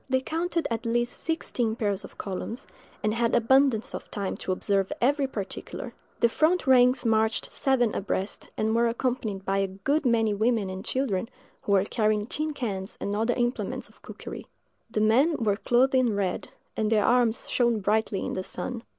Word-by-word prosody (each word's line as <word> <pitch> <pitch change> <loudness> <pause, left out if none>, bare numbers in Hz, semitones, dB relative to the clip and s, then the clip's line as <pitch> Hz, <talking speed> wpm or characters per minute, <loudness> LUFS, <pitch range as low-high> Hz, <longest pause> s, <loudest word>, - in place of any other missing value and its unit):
They 260 0 +3
counted 330 +5 -1
at 225 -1 -2
least 240 +1 0
sixteen 245 -8 -1
pairs 205 -4 -1
of - - -12
columns, 205 +6 -5 0.4
and 215 0 +1
had 230 0 +1
abundance 240 -1 +3
of - - -7
time 200 -2 -3
to - - -3
observe 195 +1 0
every 275 +2 +2
particular. 200 -7 -6 0.3
The 235 - +5
front 315 +9 +2
ranks 250 -1 +5
marched 220 0 +2
seven 245 -5 +1
abreast, 195 0 -3
and 220 +1 +1
were 235 0 +3
accompanied 230 -5 -2
by 195 0 +1
a 195 - +1
good 270 +12 -1
many 225 -4 +2
women 215 -2 +1
and 185 0 -6
children, 230 -6 -1 0.3
who 200 - 0
were 190 -1 +5
carrying 215 -2 +1
tin 305 +5 -2
cans 195 -7 -4
and 200 - -2
other 225 +3 +1
implements 240 0 -2
of - - -24
cookery. - - -9 0.4
The 220 -2 -1
men 260 +10 +4
were 210 -4 +1
clothed 250 +4 +3
in 250 -5 +3
red, 195 -3 -2 0.3
and 215 0 0
their 210 -2 +3
arms 240 -2 +2
shone 235 -3 +2
brightly 210 0 0
in - - -3
the 185 - -2
sun. 235 +5 -5
230 Hz, 180 wpm, -27 LUFS, 205-250 Hz, 0.4 s, The